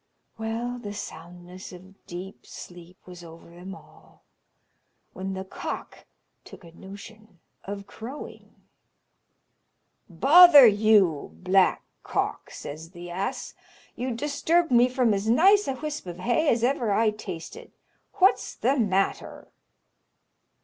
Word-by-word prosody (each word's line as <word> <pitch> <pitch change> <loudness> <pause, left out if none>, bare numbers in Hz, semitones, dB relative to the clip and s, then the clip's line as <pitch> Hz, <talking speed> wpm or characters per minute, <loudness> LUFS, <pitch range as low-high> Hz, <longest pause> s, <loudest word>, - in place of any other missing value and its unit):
Well, 235 +2 -4
the 205 -3 -7
soundness 175 0 -10
of 190 +2 -16
deep 180 +2 -9
sleep 175 +1 -12
was 180 -1 -12
over 165 0 -14
them 180 +3 -10
all, - - -20 0.9
when 190 +1 -5
the 190 0 -6
cock - - -7 0.4
took - - -14
a 170 - -14
notion 200 +2 -13 0.3
of 200 0 -6
crowing. 235 +8 -10 1.5
"Bother 285 - +8
you, 205 -8 +3
Black 185 0 +2 0.2
Cock!" - - -3
says 155 +3 -9
the 175 -1 -10
ass; 190 +3 -4 0.4
"you 255 +2 -4
disturbed 295 +6 0
me 245 +1 +5
from 250 -3 +1
as 200 +2 -2
nice 390 - +4
a 270 - -2
whisp 300 -5 -6
of 175 -1 -7
hay 245 - +1
as 230 0 +1
ever 245 -4 +1
I 215 +2 +2
tasted. 210 - -9 0.4
What's 390 0 +2
the 265 +4 0
matter?" 195 -3 -1
205 Hz, 120 wpm, -25 LUFS, 180-245 Hz, 1.5 s, Bother